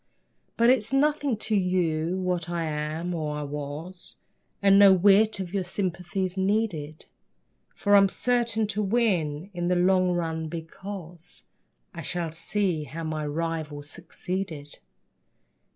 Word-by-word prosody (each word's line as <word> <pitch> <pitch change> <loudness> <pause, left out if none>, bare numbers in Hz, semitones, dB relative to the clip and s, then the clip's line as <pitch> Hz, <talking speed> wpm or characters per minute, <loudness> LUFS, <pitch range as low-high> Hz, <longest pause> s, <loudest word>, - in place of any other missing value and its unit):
But 235 +1 +6
it's 235 -3 +2
nothing 285 -2 +2
to 215 0 -1
you 180 -3 +1
what 180 -2 -1
I 170 -1 -1
am, 155 +3 -3
or 155 -3 -2
I 150 - -3
was, 150 +5 -7 0.4
And 200 0 +5
no 200 -1 +9
whit 200 +3 +5
of 185 -1 -5
your 195 -2 0
sympathy's 180 0 -2
needed, 190 -6 -1 0.7
For 205 - +1
I'm 200 -1 +7
certain 235 -1 +1
to 210 +1 -1
win 190 -6 0
in 175 -1 -2
the 180 - +2
long 185 +1 +3
run, 160 -2 -2
because 170 +1 -8 0.5
I 170 - -6
shall 170 +1 -3
see 170 -1 -1
how 160 +5 -7
my 155 -1 -3
rival 155 -1 -3
succeeded. 170 0 -6
180 Hz, 135 wpm, -26 LUFS, 160-200 Hz, 0.7 s, no